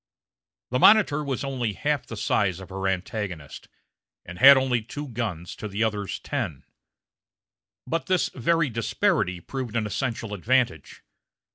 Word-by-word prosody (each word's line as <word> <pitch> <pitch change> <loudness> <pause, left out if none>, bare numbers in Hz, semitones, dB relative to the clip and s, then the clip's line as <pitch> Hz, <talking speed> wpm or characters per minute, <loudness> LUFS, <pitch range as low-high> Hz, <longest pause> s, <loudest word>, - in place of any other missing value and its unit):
The 125 - +1
Monitor 185 -6 +5
was 140 -2 -3
only 125 -6 -2
half 145 +5 -1
the 115 - -7
size 95 -3 0
of 95 - -11
her 95 0 -3
antagonist, 95 - -4 0.6
and 90 +1 -9
had 140 +1 +10
only 130 -3 +1
two 135 +6 -7
guns 105 -9 -4
to 110 - -5
the 105 +2 -1
other's 105 -3 -2
ten. - - -4 1.2
But 165 -4 -2
this 185 -2 +2
very 150 +2 +1
disparity 100 -5 0
proved 125 +4 -6
an 110 -2 0
essential 115 0 -3
advantage. 115 - 0
115 Hz, 140 wpm, -25 LUFS, 100-135 Hz, 1.2 s, had